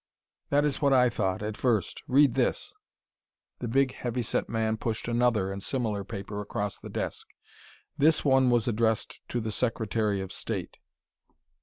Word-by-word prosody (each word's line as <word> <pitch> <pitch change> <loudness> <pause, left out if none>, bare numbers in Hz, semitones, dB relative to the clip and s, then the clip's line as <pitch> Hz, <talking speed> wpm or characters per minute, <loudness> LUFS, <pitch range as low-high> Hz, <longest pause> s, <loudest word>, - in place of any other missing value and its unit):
"That 145 +1 +3
is 145 -2 -1
what 140 -2 +4
I 125 -2 +5
thought 95 -3 -1
at 105 0 -3
first. 110 -8 0
Read 140 -1 +5
this - - 0 0.4
" - - -60
The 120 - -3
big, 130 +2 +2
heavy 120 0 -3
set - - -1
man 110 0 0
pushed 110 0 -3
another 120 -5 +2
and 100 0 -5
similar 110 -4 -1
paper 100 +1 -6
across 105 0 -3
the - - -9
desk. - - -4 0.7
"This 155 +2 +4
one 130 -2 +5
was 120 -2 +2
addressed 115 -1 0
to 120 - -1
the 110 -1 -3
Secretary 110 -3 0
of 95 -1 -5
State." - - -4
115 Hz, 165 wpm, -28 LUFS, 105-125 Hz, 0.7 s, I